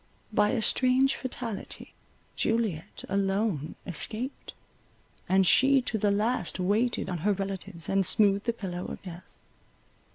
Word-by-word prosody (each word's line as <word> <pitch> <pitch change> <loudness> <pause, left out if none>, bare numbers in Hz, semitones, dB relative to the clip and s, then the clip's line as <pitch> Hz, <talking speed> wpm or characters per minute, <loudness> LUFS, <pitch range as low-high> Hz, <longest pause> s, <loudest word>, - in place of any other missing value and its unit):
By 210 0 +3
a 240 -4 0
strange 260 +3 +3
fatality 240 -5 -6 0.4
Juliet 220 -8 -2
alone 195 -5 -1
escaped, 220 - -4 0.7
and 190 0 +4
she 270 +8 +5
to 220 -3 -2
the 205 - +2
last 205 -2 0
waited 215 +6 0
on 175 -2 -3
her 205 +6 +2
relatives, 195 -3 -5
and 195 0 +2
smoothed 200 +1 +4
the - - +4
pillow 180 -5 -5
of - - -8
death. 180 -1 -10
200 Hz, 130 wpm, -28 LUFS, 190-230 Hz, 0.7 s, she